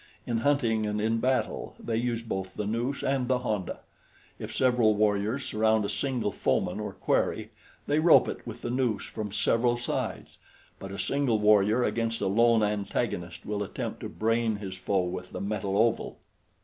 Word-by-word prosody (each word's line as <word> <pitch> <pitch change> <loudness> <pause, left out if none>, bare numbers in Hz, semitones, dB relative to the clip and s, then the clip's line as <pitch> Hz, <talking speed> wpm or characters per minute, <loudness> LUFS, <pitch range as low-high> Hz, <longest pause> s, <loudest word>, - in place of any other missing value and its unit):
In 115 -1 -1
hunting 115 -5 +1
and 105 0 -1
in 110 +2 +1
battle, 130 +2 -1
they 115 - -3
use 115 0 -1
both 95 -4 -4
the 105 - -3
noose 120 +6 -2
and 135 -2 0
the 130 0 +2
honda. 110 -7 -3 0.6
If - - -6
several 120 -4 +3
warriors 105 +5 +1
surround 110 -3 +2
a - - -2
single 125 -6 -1
foeman - - 0
or - - -4
quarry, - - 0 0.3
they 145 +1 +2
rope 165 +1 +6
it - - -4
with - - -8
the 120 - -2
noose 120 -6 0
from 105 -2 -5
several 120 +3 +2
sides; 120 - -4 0.4
but 95 - -7
a 100 - -6
single 140 -3 +1
warrior 105 +2 +4
against 115 -1 -1
a - - -1
lone 115 +2 +4
antagonist 100 -4 -2
will 105 0 -2
attempt 100 - -4
to - - -5
brain 115 0 0
his 100 -2 -6
foe 95 0 0
with 90 +1 -5
the - - -4
metal 100 0 -2
oval. 115 +1 +1
110 Hz, 175 wpm, -28 LUFS, 105-120 Hz, 0.6 s, rope